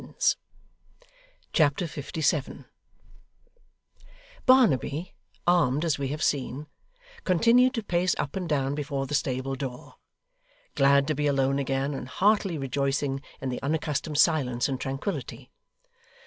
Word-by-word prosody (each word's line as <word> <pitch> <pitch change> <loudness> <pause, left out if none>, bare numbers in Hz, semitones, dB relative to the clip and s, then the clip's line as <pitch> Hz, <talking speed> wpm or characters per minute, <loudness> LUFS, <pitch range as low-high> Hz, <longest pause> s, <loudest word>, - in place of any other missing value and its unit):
Chapter 155 +2 +2
57 150 -1 -2 1.8
Barnaby, 175 - +3 0.3
armed 165 -4 +3
as 155 -4 0
we 140 - -1
have 150 +3 -3
seen, 140 +1 -1 0.6
continued 240 +8 +4
to 230 - -2
pace 180 -1 +1
up 145 - -3
and 180 -3 -3
down 140 -2 0
before 145 -2 -3
the 145 - -6
stable 135 -2 -1
door; 130 -2 -7 0.8
glad 140 -1 +4
to 155 - 0
be 150 0 0
alone 135 -1 +1
again, 135 +1 -1
and 135 - -6
heartily 195 +3 +2
rejoicing 135 0 -1 0.2
in 135 - -2
the 125 - -4
unaccustomed 150 +1 -2
silence 130 -7 +2
and 130 -2 -3
tranquillity. 135 +3 -5
145 Hz, 120 wpm, -27 LUFS, 135-165 Hz, 1.8 s, continued